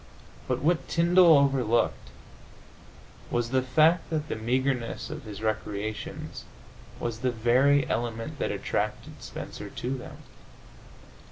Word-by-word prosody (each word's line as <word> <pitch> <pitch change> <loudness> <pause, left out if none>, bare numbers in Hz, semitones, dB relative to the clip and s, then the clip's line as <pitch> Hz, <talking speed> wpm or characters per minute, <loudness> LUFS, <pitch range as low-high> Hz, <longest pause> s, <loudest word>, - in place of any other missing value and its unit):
But - - -1
what 165 +2 +1
Tyndall 170 -1 +6
overlooked 135 -5 +1 1.2
was 120 0 -1
the 130 -1 +3
fact 155 +7 +3
that 155 -1 -2
the - - -2
meagreness 125 +3 -1
of 155 -3 -7
his 105 0 -8
recreations 110 -1 -4 0.5
was 115 -2 -3
the 130 +1 +1
very 125 +5 +3
element 115 -1 -3
that - - 0
attracted - - -3
Spencer - - -7
to 130 +2 -3
them. 125 - -9
125 Hz, 115 wpm, -27 LUFS, 115-145 Hz, 1.2 s, Tyndall